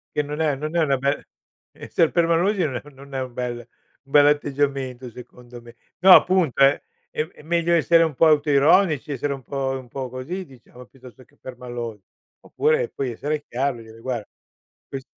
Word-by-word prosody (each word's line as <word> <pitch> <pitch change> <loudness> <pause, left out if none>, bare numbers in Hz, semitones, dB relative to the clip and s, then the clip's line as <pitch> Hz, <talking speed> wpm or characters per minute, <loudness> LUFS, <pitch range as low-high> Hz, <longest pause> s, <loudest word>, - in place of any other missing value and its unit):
Che 150 - +2
non 150 +1 -6
è 150 -3 +1
non 155 +4 -4
è 170 - +3
una 140 -2 +2
bel 140 +2 -1 0.5
Esser 165 - 0
permalosi 175 +3 +2
no 130 -6 -2
non 140 +1 -14
è 130 - -2
un 130 -2 -6
bel 125 -1 -3
un 120 +3 -19
bell'atteggiamento 140 -3 +1
secondo 120 0 -13
me. 120 0 -15 0.2
No 185 +2 +8
appunto 180 -9 +4
è 135 +1 +4 0.3
è 155 +1 -5
meglio 170 +1 0
essere 165 0 +4
un 160 - -1
po' 165 - +5
autoironici, 150 +1 +3
essere 140 +1 -2
un 135 -2 -9
po 135 -1 -3
un 130 -2 -11
po' 130 0 -5
così, 170 +10 -6
diciamo, 125 -2 -16
piuttosto 130 0 -16
che - - -30
permalosi. 120 -4 -7 0.4
Oppure 470 +1 +1
puoi 130 -3 -4
essere 145 +5 -3
chiaro 130 0 -2
e - - -11
dire: 110 0 -15
"Guarda 120 -3 -4 0.6
ques" 135 -1 -7
140 Hz, 180 wpm, -23 LUFS, 125-155 Hz, 0.6 s, No